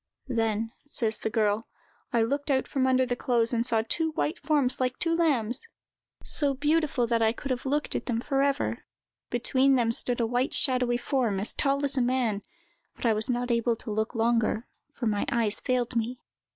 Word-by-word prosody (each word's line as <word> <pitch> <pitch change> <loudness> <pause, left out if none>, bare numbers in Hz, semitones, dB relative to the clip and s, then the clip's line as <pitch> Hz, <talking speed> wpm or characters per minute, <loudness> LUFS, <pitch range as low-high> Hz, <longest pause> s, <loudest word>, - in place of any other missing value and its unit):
—"Then," 225 -2 -1
says 230 -6 0
the - - -2
girl, 215 0 0 0.4
"I 235 -1 +3
looked 280 +5 -2
out 265 -2 +1
from 260 -2 0
under 260 0 +3
the 245 -1 -2
clothes, 240 -1 0
and 230 -1 +1
I - - +3
saw 225 -1 +2
two 320 +6 0
white 310 +3 -1
forms, 290 -4 +1
like 255 0 0
two 330 -1 +1
lambs—so 275 0 -1
beautiful 295 -2 +1
that 230 0 0
I 220 0 +4
could 265 +4 -6
have 255 +1 -2
looked 295 +2 -1
at - - -4
them 235 -3 0
for 270 +2 0
ever. 280 0 0 0.5
Between 260 +3 +2
them 235 -3 +2
stood 245 +1 +2
a 230 - +2
white, 245 +3 0
shadowy 250 -2 +3
form, 240 -6 0
as 205 - 0
tall 280 +1 +1
as 275 -1 -1
a - - +3
man, 240 -4 0 0.5
but - - -7
I 230 - +4
was 215 +4 0
not 245 0 -1
able 235 0 +1
to 220 - -7
look 220 +3 -2
longer, 230 0 +1 0.3
for 260 - -5
my 210 -2 0
eyes 225 -3 +3
failed 250 -1 -1
me." 235 +2 -1
245 Hz, 200 wpm, -27 LUFS, 230-270 Hz, 0.5 s, I